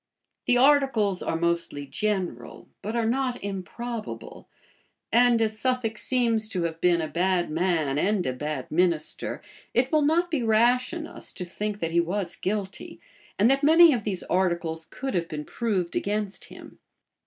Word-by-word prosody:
[*] - - -50
The 245 - +4
articles 260 -8 +3
are - - -2
mostly 170 -4 -1
general, 180 - -3
but 215 +3 -4
are 230 -1 +1
not 250 +1 0
improbable; 215 +4 -6 0.6
and 240 0 +5
as 215 0 0
Suffolk 250 -4 0
seems 230 -4 +1
to 185 -5 -2
have 165 -1 -4
been 175 -1 +3
a 160 - -2
bad 175 0 0
man 160 -4 0
and 200 +1 +1
a 130 - -1
bad 150 0 -4
minister, 170 -1 0 0.3
it 250 +3 +2
will 310 -1 +4
not 335 +4 +2
be 305 -6 0
rash 240 +4 +3
in 340 -2 -5
us - - -7
to 180 - -5
think 205 +3 -4
that 165 0 -1
he 170 - +3
was 175 +1 -1
guilty, 195 -1 -4 0.4
and 205 - +4
that 275 0 +2
many 325 +1 +7
of 235 -4 -2
these 195 -4 -2
articles 170 -3 -1
could 270 0 -5
have 170 -2 0
been 150 -2 -6
proved 200 -7 -2
against 205 -1 -2
him. - - -13
205 Hz, 170 wpm, -26 LUFS, 170-245 Hz, 0.6 s, many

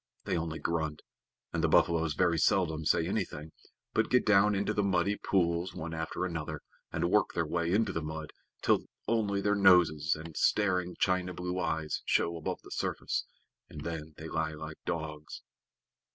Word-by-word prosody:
They - - -1
only 80 -1 -2
grunt, 80 -3 -2 0.5
and - - -1
the - - +4
buffaloes 80 -2 +3
very 85 -3 +2
seldom 80 -3 +2
say 80 +1 +3
anything, 80 -6 -3 0.4
but - - +2
get 125 - +3
down 105 0 +5
into 100 +1 0
the 105 - +1
muddy 100 +1 +1
pools 90 -2 0
one 80 +1 -5
after 80 +3 -3
another, 85 -4 -4 0.3
and 85 - 0
work 105 - +3
their 85 - +1
way 85 +2 -1
into 110 +4 +2
the 80 - -2
mud 80 0 -6 0.3
till - - +3 0.2
only 105 -3 +1
their 105 +1 +2
noses 90 -7 +5
and 80 0 -9
staring 90 -4 +2
china 90 -1 +1
blue 90 +1 -3
eyes 80 -3 -1
show 85 - +1
above 80 - -4
the - - -13
surface, - - -2 0.4
and 75 - -8
then 80 -2 -5
they 80 - -7
lie 80 -1 -1
like 80 0 -7
logs. 75 -3 -4
85 Hz, 170 wpm, -31 LUFS, 80-95 Hz, 0.5 s, down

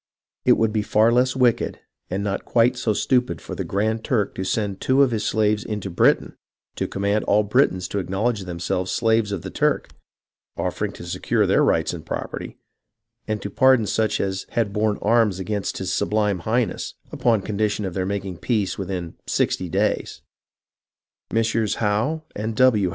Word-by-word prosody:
It - - +7
would 110 -1 +1
be 110 - +1
far 110 +2 +3
less 125 +2 +2
wicked 125 -3 +1 0.3
and 95 +2 -2
not 100 -1 -2
quite 120 +1 +3
so 120 -3 0
stupid 125 - +1
for - - -8
the - - -3
Grand 110 +3 -1
Turk 110 -8 0
to 95 - -4
send 100 0 -2
two 135 +2 +4
of 130 - +2
his 110 -2 -1
slaves 105 -1 +1
into 105 -3 -4
Britain - - +2 0.4
to - - -1
command 100 +2 0
all 105 +1 +3
Britons 105 -5 +2
to 100 - -1
acknowledge 100 +5 -1
themselves 90 +1 -2
slaves 110 +1 +2
of 95 -5 -3
the - - -6
Turk, - - 0 0.7
offering - - -2
to - - -10
secure 85 - 0
their - - +3
rights - - +2
and - - -7
property, - - -5 0.7
and 110 -1 -2
to 100 - -5
pardon 130 0 +4
such 110 0 0
as 95 -1 -2
had 110 -4 0
borne 105 0 +1
arms 110 -3 +3
against 100 +1 -3
his 95 -1 -2
Sublime 105 -3 +1
Highness, 110 +3 -1 0.2
upon 115 -5 +1
condition 105 0 -1
of 95 - -4
their 95 +1 -2
making 100 -3 -3
peace 105 0 -1
within 90 -3 -4
'sixty 90 - 0
days.' - - -1 0.5
" - - -60
Messieurs 115 -2 +1
Howe 115 +9 0
and 110 +1 -3
W. 110 -7 +4
105 Hz, 175 wpm, -23 LUFS, 95-115 Hz, 0.7 s, It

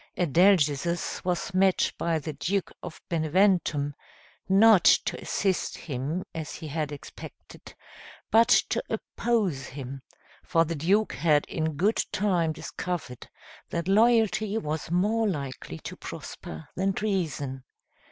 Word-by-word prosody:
Adalgisus 170 -1 +2
was 180 +1 -2
met 190 0 +3
by 170 -1 0
the 155 0 -5
Duke 195 +6 -2
of 160 - -8
Beneventum, 160 -3 +2 0.6
not 200 -1 +6
to - - +4
assist 190 -2 -1
him, 145 +5 -4
as 160 -2 -5
he 160 - -7
had 150 0 -2
expected, 145 - -11 0.6
but 230 +1 +6
to 230 +1 +3
oppose 215 - -1
him, 135 0 -7 0.4
for 165 0 +2
the 165 - -3
duke 190 +8 +1
had 150 -3 +2
in 160 -1 -2
good 200 +9 +2
time 185 -5 +1
discovered 155 -5 -5 0.4
that 170 0 -3
loyalty 220 0 +3
was 155 -5 -3
more 210 +6 +1
likely 140 - -4
to - - -8
prosper 80 0 -8
than 195 +1 0
treason. 155 -11 -2
170 Hz, 125 wpm, -27 LUFS, 150-195 Hz, 0.6 s, not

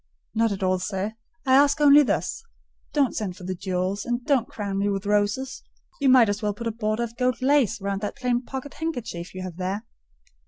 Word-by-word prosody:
"Not 225 0 +2
at 195 -1 -3
all, 185 0 +2
sir; 195 +3 -3 0.3
I 260 - +3
ask 285 +2 +5
only 295 0 +8
this: 295 - -1 0.5
don't 280 -5 +2
send 190 -4 -3
for - - -11
the 185 +1 -3
jewels, 185 +2 -2
and 240 0 -2
don't 265 -5 +2
crown 200 -2 -3
me 200 +1 +1
with 200 0 -2
roses: 210 +6 0 0.4
you 280 -2 +3
might 255 -3 +7
as 205 +1 -1
well 210 -2 -1
put 235 - -7
a 230 - 0
border 215 +1 -1
of 235 0 -6
gold 250 -1 +1
lace 260 -4 +3
round 200 0 -2
that 205 - -3
plain 250 -2 0
pocket 265 +2 -7
handkerchief 235 - -5
you 185 - -5
have 180 -2 -7
there." 190 +3 -2
220 Hz, 210 wpm, -25 LUFS, 195-260 Hz, 0.5 s, only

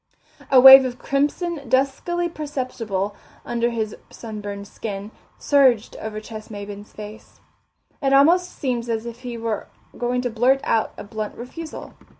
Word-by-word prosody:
A 265 - +7
wave 265 +1 +11
of 250 -1 -4
crimson, 285 +2 -1
duskily 275 +7 +1
perceptible 250 - -4 0.3
under 235 0 0
his 220 -3 -3
sunburned 205 -3 -7
skin, 205 -1 -6 0.3
surged 260 -6 +3
over 215 -1 -5
Ches 215 0 -9
Maybin's 205 0 -8
face. 215 +1 -11 0.6
It 270 -2 +1
almost 340 +7 +5
seemed 245 -3 -3
as 225 0 -2
if 235 0 -7
he 245 -2 -6
were 225 -2 -3 0.3
going 245 +1 -1
to 245 - -1
blurt 250 +4 +3
out 220 - +1
a - - -7
blunt 215 0 -5
refusal. 310 +7 -8
240 Hz, 145 wpm, -22 LUFS, 215-270 Hz, 0.6 s, wave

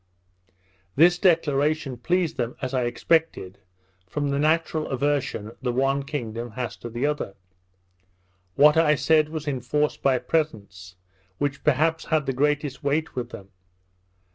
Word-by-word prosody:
This 175 +4 +5
declaration 150 -5 +2
pleased 170 +6 0
them, 120 -1 -3
as 130 -1 -4
I 125 -2 +1
expected, 120 - 0 0.5
from 145 +8 -2
the 140 0 0
natural 155 +1 +1
aversion 135 -6 -1
the 125 -2 -1
one 135 +3 +1
kingdom 120 -5 -5
has 125 -1 -4
to 120 - -8
the 120 +4 -2
other. 145 -9 -2 1.2
What 150 +2 +6
I 155 -2 +4
said 155 +2 +3
was 155 -1 -6
enforced 145 +2 -1
by 135 -2 +3
presents, 100 - -3 0.4
which 140 +3 -2
perhaps 155 +3 +2
had 155 -2 0
the 135 - -1
greatest 145 +1 -1
weight 150 +3 -1
with 125 -2 -3
them. 95 0 -11
140 Hz, 140 wpm, -24 LUFS, 125-155 Hz, 1.2 s, What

